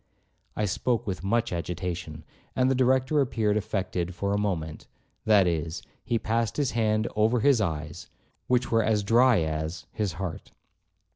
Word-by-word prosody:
I 105 - 0
spoke 120 +5 -1
with 95 -3 -4
much 115 +3 0
agitation, 85 -2 -4 0.3
and 130 0 +3
the - - +4
Director 130 +3 +2
appeared 110 -5 0
affected 95 -4 -2
for 100 +2 -1
a - - +1
moment; 80 -7 -3 0.4
that 105 -3 +5
is, 85 -1 -2 0.2
he 120 - 0
passed 115 0 -1
his 145 -3 +1
hand 110 -1 +1
over 110 +3 +2
his 135 -2 +4
eyes, 80 -3 -4 0.4
which 125 0 +1
were 115 0 +4
as 105 -1 +1
dry 120 0 +4
as—his 80 +5 -3
heart. 90 -2 -6
105 Hz, 150 wpm, -27 LUFS, 90-115 Hz, 0.4 s, that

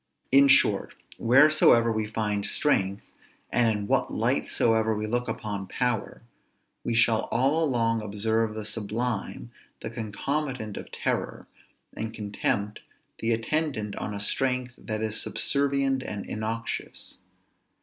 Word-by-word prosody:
_ - - -41
In 140 +1 +7
short, 135 - +4 0.2
wheresoever 120 -2 +5
we 110 -1 -1
find 105 -2 -1
strength, 100 -7 0 0.5
and 120 -2 +3
in 100 -1 -5
what - - +1
light - - 0
soever 110 -1 +2
we 105 - -2
look 120 +3 -1
upon 100 -3 -4
power, 120 +1 -2 0.6
we 120 - -1
shall 115 -1 +3
all 145 +6 +1
along 115 -5 +1
observe 110 +1 0
the 110 -1 -5
sublime 110 +1 -3 0.3
the - - -5
concomitant 120 0 -3
of - - -8
terror, - - -3 0.5
and 110 0 -5
contempt 105 0 -2 0.4
the 115 - 0
attendant 115 -2 -1
on - - -4
a - - -4
strength 125 +3 0
that 110 -1 -4
is 110 0 0
subservient 140 -1 +1
and 105 -6 -5
innoxious. 110 +1 -5
115 Hz, 130 wpm, -26 LUFS, 105-125 Hz, 0.6 s, In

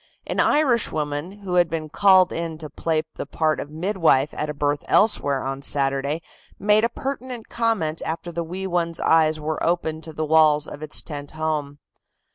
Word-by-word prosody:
An - - -3
Irish 265 -7 +3
woman 150 +2 -3
who 185 -2 -4
had 175 -2 +4
been 160 -1 -3
called 190 +2 +4
in 165 -1 -4
to 155 -2 -8
play 160 -1 -1
the - - -5
part 155 0 0
of 145 - -5
midwife 160 -4 +1
at 150 - -3
a - - -2
birth 145 0 -1
elsewhere 145 -10 +2
on 135 +1 -4
Saturday, 140 +3 0 0.3
made 210 +1 +3
a 230 - +3
pertinent 255 -2 -6
comment 220 -10 -1
after 170 +2 -4
the 170 0 -3
wee 185 +4 -5
one's 170 -2 -1
eyes 155 -1 +3
were 155 +1 -3
opened 160 -2 -1
to 160 - -9
the 155 0 -2
walls 155 -1 +4
of 145 - -9
its 155 -1 -1
tent 145 -2 -7
home. 155 -2 -3
160 Hz, 185 wpm, -23 LUFS, 150-180 Hz, 0.3 s, had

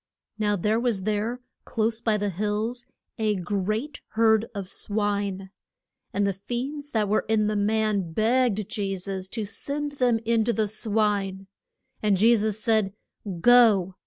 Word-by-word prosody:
Now 210 -1 +2
there 210 +4 +1
was 235 -6 0
there, 215 +4 -1 0.2
close 225 0 -1
by 220 -2 +1
the 205 -1 -1
hills, 215 +6 -2 0.3
a 215 -1 +1
great 210 - -2
herd 220 0 +3
of 195 -2 -4
swine. 200 -2 -2 0.6
And 200 0 +1
the 200 - +1
fiends 260 +9 -5
that 220 -6 0
were 210 +2 +1
in 220 -1 +3
the 210 0 0
man 210 -3 0
begged 220 +1 +1
Je 195 -2 -2
sus 190 0 -4
to 220 +2 -4
send 285 +7 -3
them 245 -3 +3
in 230 -1 +3
to 235 - +1
the 220 -2 +1
swine. 205 -2 0 0.6
And 210 -2 +2
Je 230 +5 +5
sus 215 -1 0
said, 215 -4 +2 0.5
Go. 220 -6 +5
215 Hz, 155 wpm, -25 LUFS, 200-230 Hz, 0.6 s, Je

